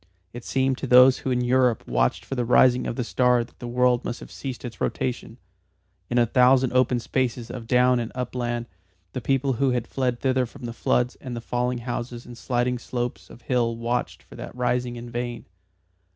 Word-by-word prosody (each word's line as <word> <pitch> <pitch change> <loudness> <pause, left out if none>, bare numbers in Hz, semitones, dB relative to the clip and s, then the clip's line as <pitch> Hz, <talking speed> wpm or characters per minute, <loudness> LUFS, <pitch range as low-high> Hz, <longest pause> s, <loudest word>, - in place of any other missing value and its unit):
It 120 0 -8
seemed 130 -1 0
to - - -4
those 125 +1 +7
who - - -3
in 125 -1 +1
Europe 125 -1 +2
watched - - 0
for - - -5
the 125 -2 0
rising 125 +1 +4
of - - -3
the 125 - -1
star 125 0 +2
that 115 - -18
the 120 - -6
world 125 0 +2
must 120 - -4
have - - -11
ceased 130 -2 -6
its 120 - -8
rotation. 125 -2 -3 0.7
In 120 - 0
a 120 - +5
thousand 125 +2 +4
open 125 -1 +3
spaces 120 -1 -2
of 120 -2 -7
down 125 0 +4
and 115 - -4
upland 120 -1 -3 0.5
the 130 - -3
people 135 +2 +1
who 135 +3 +1
had 125 -2 0
fled 125 -3 -1
thither 130 -2 +1
from 120 - -11
the 115 - -5
floods 125 +2 0
and 125 -2 -7
the - - -4
falling 125 +1 -1
houses 120 -1 -4
and 120 - -10
sliding 125 0 -1
slopes 120 0 -4
of 120 - -14
hill 120 -2 0
watched 120 +1 -2
for - - -17
that - - -8
rising 125 0 -1
in 120 0 -8
vain. 120 0 -4
125 Hz, 205 wpm, -24 LUFS, 120-125 Hz, 0.7 s, those